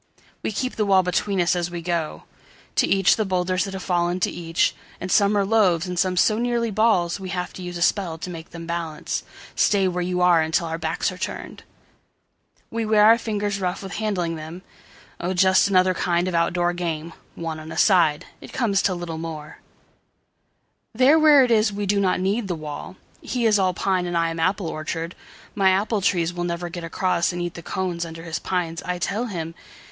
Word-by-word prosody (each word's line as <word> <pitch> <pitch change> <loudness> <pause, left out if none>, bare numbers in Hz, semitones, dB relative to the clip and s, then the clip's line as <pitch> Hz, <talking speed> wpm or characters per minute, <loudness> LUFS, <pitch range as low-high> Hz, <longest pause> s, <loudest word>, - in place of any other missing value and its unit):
We - - -2
keep 255 +5 -3
the 215 - +1
wall 190 -1 +5
between 185 +2 0
us 175 0 +2
as 175 -1 -1
we 175 -1 -6
go. 170 -3 -2 0.5
To - - +4
each 195 -2 +4
the 220 - +1
boulders 185 -1 0
that 195 -1 -6
have 190 - -6
fallen 175 0 0
to - - +1
each. 165 -1 0 0.3
And 185 - -5
some 205 0 +4
are 200 - +2
loaves 195 -6 +3
and 180 -1 -3
some 185 -1 +1
so 215 +4 +3
nearly 235 -1 0
ballsWe 195 -3 +1
have 180 -1 -3
to - - -9
use 180 -1 -5
a 170 - 0
spell 175 -4 +1
to 165 - -6
make 165 -1 -9
them 170 -1 -9
balance:"Stay 170 +4 -1
where 180 -1 -1
you 180 0 -1
are 175 -2 +5
until 160 +2 0
our 165 0 -4
backs 160 +4 -1
are 185 - -10
turned!"We 230 +4 -9
wear 215 -1 +4
our 225 +2 +7
fingers 205 -3 -2
rough 185 +2 -2
with 195 - -7
handling 180 -6 -2
them. 160 +4 -8 0.6
Oh, 185 +2 -2
just 190 +2 +4
another 185 -1 +3
kind 175 0 0
of 185 - -2
out 170 0 +2
door 175 0 +1
game, 165 -2 -4 0.2
One 165 -2 -5
on 155 +1 -9
a - - -6
side. 165 -7 +4 0.2
It - - -11
comes 200 -6 +1
to 185 - +1
little 170 -2 -5 1.7
more:There 260 +7 +4
where 300 -3 +7
it 250 - +1
is 215 -1 +4
we 205 0 -3
do 200 +1 +2
not 190 -2 +1
need 200 +4 0
the 180 - -2
wall:He 165 - -6
is 210 -2 +4
all 185 -2 +1
pine 185 -2 0
and 175 -1 -1
I 165 0 +1
am 165 - -5
apple 185 +3 +1
orchard.My 165 +5 -3
apple 205 +3 +1
trees 175 -2 +1
will 175 0 -3
never 175 0 -3
get 170 0 -7
acrossAnd 175 0 0
eat 175 -1 -3
the 170 - -8
cones 175 0 -3
under 165 0 -8
his 165 -1 -4
pines, 175 -3 -2
I 180 0 -3
tell 205 +6 -2
him. 165 -6 -5
180 Hz, 200 wpm, -23 LUFS, 170-200 Hz, 1.7 s, our